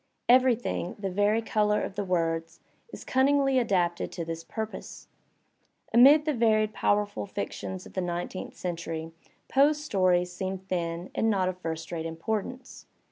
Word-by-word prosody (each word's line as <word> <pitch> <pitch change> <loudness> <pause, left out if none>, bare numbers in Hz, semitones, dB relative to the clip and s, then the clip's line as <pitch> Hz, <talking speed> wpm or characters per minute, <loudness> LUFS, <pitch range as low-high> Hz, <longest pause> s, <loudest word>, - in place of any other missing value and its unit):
Everything, 245 -7 +3
the 195 -2 -3
very 205 +4 +2
colour 210 -1 +1
of - - -4
the 205 - -2
words, 165 -3 -1 0.3
is - - -9
cunningly 270 0 +3
adapted 180 -7 0
to 170 - -5
this 165 0 -5
purpose. 220 +4 -7 0.9
Amid 280 +6 +7
the 305 - +1
varied 215 -3 +2
powerful 205 -1 0
fictions 190 -2 -5
of - - -13
the 185 - -1
nine 175 0 -2
teenth 185 - -8
century 165 -2 -4 0.4
Poe's 295 +2 +3
stories 180 -5 +2
seem 190 +1 -3
thin 175 -2 -4
and 225 - +1
not 190 -3 +2
of 185 0 -6
first 165 -1 -5
rate 165 -1 -3
importance. 220 +9 -5
195 Hz, 150 wpm, -28 LUFS, 175-225 Hz, 0.9 s, Amid